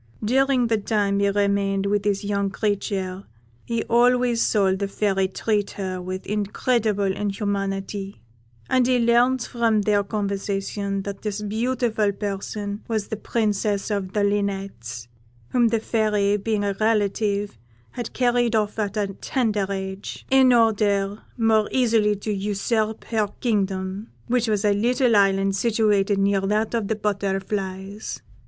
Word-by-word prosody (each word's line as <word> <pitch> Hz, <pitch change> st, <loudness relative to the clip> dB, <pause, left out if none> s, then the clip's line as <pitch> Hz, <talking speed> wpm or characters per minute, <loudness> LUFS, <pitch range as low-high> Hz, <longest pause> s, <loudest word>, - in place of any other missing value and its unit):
"During 265 Hz, +1 st, +3 dB
the 225 Hz, -2 st, +1 dB
time 200 Hz, -1 st, 0 dB
he 200 Hz, 0 st, +3 dB
remained 200 Hz, -1 st, +1 dB
with 205 Hz, 0 st, +1 dB
this 205 Hz, 0 st, 0 dB
young 200 Hz, -1 st, 0 dB
creature 195 Hz, -2 st, -2 dB, 0.4 s
he 230 Hz, -1 st, -1 dB
always 245 Hz, 0 st, +3 dB
saw 195 Hz, -3 st, +3 dB
the 200 Hz, +1 st, -2 dB
Fairy 195 Hz, -1 st, 0 dB
treat 205 Hz, +1 st, -1 dB
her 185 Hz, -2 st, -3 dB
with 185 Hz, +1 st, -5 dB
incredible 210 Hz, +1 st, 0 dB
inhumanity, 195 Hz, -, -3 dB, 0.5 s
and 255 Hz, -1 st, +3 dB
he 255 Hz, -1 st, +3 dB
learnt 240 Hz, +2 st, +3 dB
from 230 Hz, -3 st, +1 dB
their 205 Hz, 0 st, +2 dB
conversation 200 Hz, -1 st, -2 dB
that 200 Hz, 0 st, -6 dB
this 210 Hz, -1 st, -3 dB
beautiful 220 Hz, -1 st, 0 dB
person 205 Hz, +1 st, -4 dB
was 220 Hz, -3 st, -2 dB
the -, -, -2 dB
Princess 210 Hz, -1 st, -1 dB
of 195 Hz, -2 st, -2 dB
the 210 Hz, -, +1 dB
Linnets, 195 Hz, -, -2 dB, 0.4 s
whom 240 Hz, -2 st, +3 dB
the 225 Hz, 0 st, +1 dB
Fairy, 210 Hz, -2 st, +1 dB
being 210 Hz, 0 st, -1 dB
a 200 Hz, -1 st, 0 dB
relative, 205 Hz, -, 0 dB, 0.3 s
had 240 Hz, -2 st, -5 dB
carried 240 Hz, -2 st, +2 dB
off 210 Hz, 0 st, 0 dB
at 205 Hz, 0 st, -2 dB
a 210 Hz, -, +1 dB, 0.2 s
tender 215 Hz, -7 st, 0 dB
age, 190 Hz, 0 st, -5 dB
in 265 Hz, -1 st, +6 dB
order 210 Hz, -3 st, +2 dB, 0.2 s
more 220 Hz, -2 st, +3 dB
easily 225 Hz, -5 st, +3 dB
to 210 Hz, +1 st, -3 dB
usurp 210 Hz, +2 st, -1 dB
her 220 Hz, -2 st, 0 dB
kingdom, 195 Hz, -2 st, -1 dB, 0.2 s
which 245 Hz, -1 st, +1 dB
was 210 Hz, -1 st, 0 dB
a 205 Hz, -, +4 dB
little 240 Hz, +3 st, +2 dB
island 195 Hz, -1 st, +3 dB
situated 210 Hz, -2 st, +2 dB
near 195 Hz, 0 st, +2 dB
to 195 Hz, -, -2 dB
that 215 Hz, +3 st, 0 dB
of 225 Hz, -3 st, 0 dB
the 220 Hz, -, 0 dB
Butterflies. 195 Hz, -1 st, -3 dB
205 Hz, 145 wpm, -23 LUFS, 195-225 Hz, 0.5 s, in